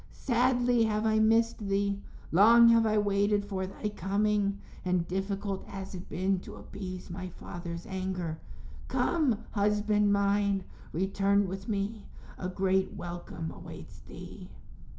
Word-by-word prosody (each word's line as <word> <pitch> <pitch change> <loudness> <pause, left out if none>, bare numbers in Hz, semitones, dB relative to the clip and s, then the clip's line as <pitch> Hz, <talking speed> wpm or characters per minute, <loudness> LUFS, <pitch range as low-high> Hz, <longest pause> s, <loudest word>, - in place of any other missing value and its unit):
Sadly 245 -1 +2
have 215 0 0
I 220 0 +3
missed 225 +1 +3
thee; 200 -1 0 0.3
long 230 +6 +7
have 230 -1 +5
I 215 0 +2
waited 205 0 +2
for 190 -2 -3
thy 210 +2 -4
coming, 200 +1 0 0.3
and 180 -2 0
difficult 195 +1 -2
has 195 -1 -7
it 185 -1 -8
been 190 +1 0
to - - -10
appease 185 -2 -8
my 185 +1 -5
father's 170 -1 -7
anger. 185 -4 -3 0.5
Come, 260 -10 +1
husband 210 0 +2
mine, 200 -1 +2 0.3
return 195 +3 +2
with 195 +3 -6
me; 205 +1 -2 0.3
a 180 - -3
great 190 0 +1
welcome 175 -2 -6
awaits - - -10
thee." - - -11
200 Hz, 130 wpm, -30 LUFS, 190-210 Hz, 0.5 s, long